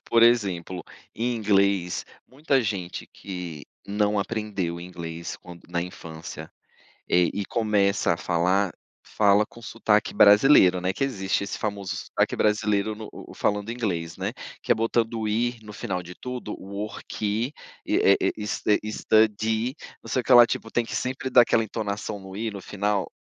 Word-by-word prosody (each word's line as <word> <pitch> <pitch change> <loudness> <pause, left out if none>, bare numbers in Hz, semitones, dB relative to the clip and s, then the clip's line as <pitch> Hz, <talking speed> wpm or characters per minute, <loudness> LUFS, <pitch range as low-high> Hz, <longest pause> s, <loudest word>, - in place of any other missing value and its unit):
Por 115 0 +5
exemplo, 95 -7 +2 0.3
em 120 +2 -1
inglês, 100 -4 +2 0.2
muita 135 0 +1
gente 95 -5 -4
que 90 -6 -7 0.2
não 105 0 +1
aprendeu 100 -5 -2
inglês 85 -1 -6
quando 90 -1 -13
na 85 0 -1
infância, 80 -2 -8 0.6
eh, 90 -1 +4
e 100 - -2
começa 105 -5 +2
a - - -8
falar, 90 +3 +1 0.3
fala 105 0 +3
com 120 - -15
sotaque 110 -2 +1
brasileiro, 105 -3 +6
né, 90 +1 0
que 95 - -4
existe 100 -9 0
esse 100 - -5
famoso 100 -3 -3
sotaque - - -1
brasileiro 105 0 +1
no 110 0 -8
o - - -11
o - - -11
falando 105 +1 -1
inglês, 90 -9 -3
né, - - -3 0.3
que - - -8
é - - +7
botando 115 0 0
o 110 - -1
i 120 +3 0
no 105 -1 -10
final 95 -4 -3
de 90 +1 -10
tudo, 125 -2 -6
"worki", 105 +4 -3 0.3
e, - - +1
eh 100 - +5
eh, - - +1
s 105 -2 -4
eh, 105 - +5
"studi", 110 +3 +2 0.3
não - - -12
sei 130 - +1
o - - -9
que - - +2
lá, 120 -1 +10
tipo, 115 - -4
tem 120 - +1
que - - -7
sempre 130 +1 -2
dar 125 - +7
aquela 115 -1 +2
entonação 105 -1 -4
no 95 0 -10
i 110 +2 -2
no 100 -1 -7
final. 100 0 -1
105 Hz, 175 wpm, -25 LUFS, 95-115 Hz, 0.6 s, lá